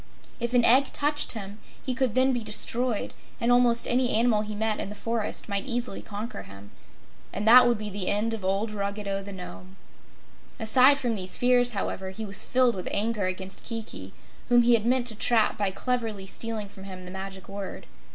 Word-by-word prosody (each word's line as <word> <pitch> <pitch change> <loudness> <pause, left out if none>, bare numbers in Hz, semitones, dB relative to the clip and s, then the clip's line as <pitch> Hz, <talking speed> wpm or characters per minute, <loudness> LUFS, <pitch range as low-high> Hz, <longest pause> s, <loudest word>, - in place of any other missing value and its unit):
If 240 +1 -2
an 240 -1 +5
egg 265 +3 +6
touched 295 +1 +1
him 205 -2 -8 0.3
he 255 - -1
could 250 -3 -1
then 260 +1 +3
be 240 -2 -2
destroyed, 240 +1 +2 0.3
and 235 +1 +1
almost 245 -1 +3
any 245 0 +2
animal 225 -1 +3
he 210 0 -5
met 220 0 -1
in - - -4
the 210 - -8
forest 225 0 -4
might 200 +1 -2
easily 240 -4 -3
conquer 215 +4 -7
him. 100 +1 -14 0.6
And 205 +2 -4
that 250 +2 +8
would 240 -2 +2
be 210 0 -5
the 195 -1 -2
end 215 +3 +1
of 220 -3 -6
old 195 +3 -1
Ruggedo 200 -1 -3
the 200 +1 -9
Nome. 185 0 -10 0.8
Aside 255 +5 +5
from 245 -4 -2
these 185 -3 -1
fears, 245 -1 +3
however, 190 -1 -4
he 215 +4 -7
was 200 -1 +2
filled 255 -1 +2
with 185 - -5
anger 210 -2 0
against 190 +1 -6
Kiki, 155 - -7 0.4
whom 240 -1 +5
he 240 0 +4
had 230 -1 +2
meant 250 0 +2
to 230 -3 0
trap 220 0 +2
by 205 -2 0
cleverly 225 -1 -3
stealing 220 +1 -4
from 195 -1 -13
him 185 -1 -9
the 180 - -9
Magic 190 0 -8
Word. 200 -1 -7
220 Hz, 200 wpm, -26 LUFS, 195-245 Hz, 0.8 s, that